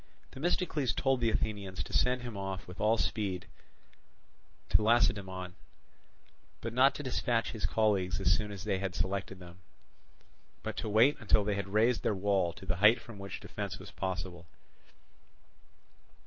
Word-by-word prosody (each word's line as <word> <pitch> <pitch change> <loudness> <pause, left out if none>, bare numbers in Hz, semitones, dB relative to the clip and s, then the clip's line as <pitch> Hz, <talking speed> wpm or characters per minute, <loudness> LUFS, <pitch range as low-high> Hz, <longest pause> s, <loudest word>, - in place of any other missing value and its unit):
Themistocles 150 - 0
told 135 -2 +1
the 115 - +3
Athenians 100 -3 -2
to - - -10
send 125 0 +2
him 120 -3 -6
off 95 -1 -5
with 90 +1 -9
all 110 +2 +3
speed 95 -7 -1 1.2
to - - +4
Lacedaemon, 100 -5 +1 1.1
but 115 0 -5
not 130 +3 +5
to 145 - -5
dispatch 120 -3 0
his 110 -2 -2
colleagues 95 - +1
as 90 - +4
soon 105 +1 -3
as 100 -1 -7
they 100 -3 0
had 95 -2 -3
selected 95 0 -2
them, 90 0 -13 1.0
but - - -4
to 110 - -3
wait 115 +7 +5
until 105 0 +3
they 105 0 0
had 100 -1 -3
raised 110 +4 +2
their 105 - 0
wall 95 -2 +1
to 90 - -12
the 95 -1 -1
height 105 +5 +6
from 115 -4 -11
which 100 -1 -6
defence - - -5
was - - -11
possible. 90 -2 -4
105 Hz, 160 wpm, -32 LUFS, 95-115 Hz, 1.2 s, height